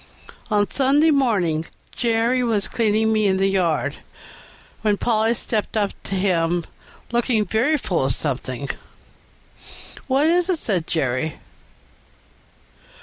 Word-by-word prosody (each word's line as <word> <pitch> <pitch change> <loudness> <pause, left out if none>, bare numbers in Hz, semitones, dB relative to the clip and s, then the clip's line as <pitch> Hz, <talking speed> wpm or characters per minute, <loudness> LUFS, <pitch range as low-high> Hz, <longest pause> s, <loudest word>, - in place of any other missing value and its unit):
On 205 -2 +2
Sunday 285 +4 +3
morning 200 - +1 0.3
Jerry 235 +1 +1
was 215 -4 0
cleaning 220 -1 +1
me 215 -1 +2
in 190 -1 +2
the 190 - +2
yard, 165 -6 0 0.8
when 210 -2 +1
Polly 225 +1 +1
stepped 220 -1 -2
up 205 -2 +1
to 195 - -2
him, 175 -3 +1 0.5
looking 235 -2 +1
very 235 - +1
full 180 - -1
of 130 - 0
something. 135 -1 -3 1.4
"What 275 +2 +2
is 350 +3 +3
it?" 365 - +2
said 185 - -1
Jerry. 140 0 -1
210 Hz, 120 wpm, -22 LUFS, 175-240 Hz, 1.4 s, Sunday